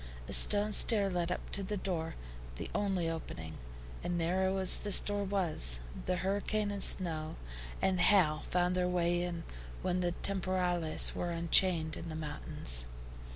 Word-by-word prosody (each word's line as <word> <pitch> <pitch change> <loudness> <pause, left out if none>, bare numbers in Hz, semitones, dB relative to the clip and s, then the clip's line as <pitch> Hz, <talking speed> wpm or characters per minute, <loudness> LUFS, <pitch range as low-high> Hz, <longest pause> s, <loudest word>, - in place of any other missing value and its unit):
A - - -6
stone 210 +1 +4
stair 205 -2 +3
led 175 -1 -2
up - - -5
to 200 - +1
the 205 +2 -4
door, 170 -4 -4 0.4
the - - -7
only 195 -5 -1
opening; 85 - -6 0.4
and 175 - -2
narrow 190 +3 0
as 190 -1 +3
this 205 -2 +4
door 205 0 -2
was, 170 - +2 0.3
the 180 - +1
hurricane, 205 +3 -1
and 200 -1 -5
snow, 160 -5 +1 0.5
and 185 -2 +1
hail 170 -5 +4
found 180 0 +1
their 180 0 0
way 175 -1 0
in 175 -1 -4 0.4
when 180 0 0
the 175 -1 -1
TEMPORALES 180 -4 +2
were 175 - -3
unchained 170 -1 +3
in 165 - -7
the 155 - -6
mountains. 60 - -3
180 Hz, 155 wpm, -32 LUFS, 165-195 Hz, 0.5 s, stone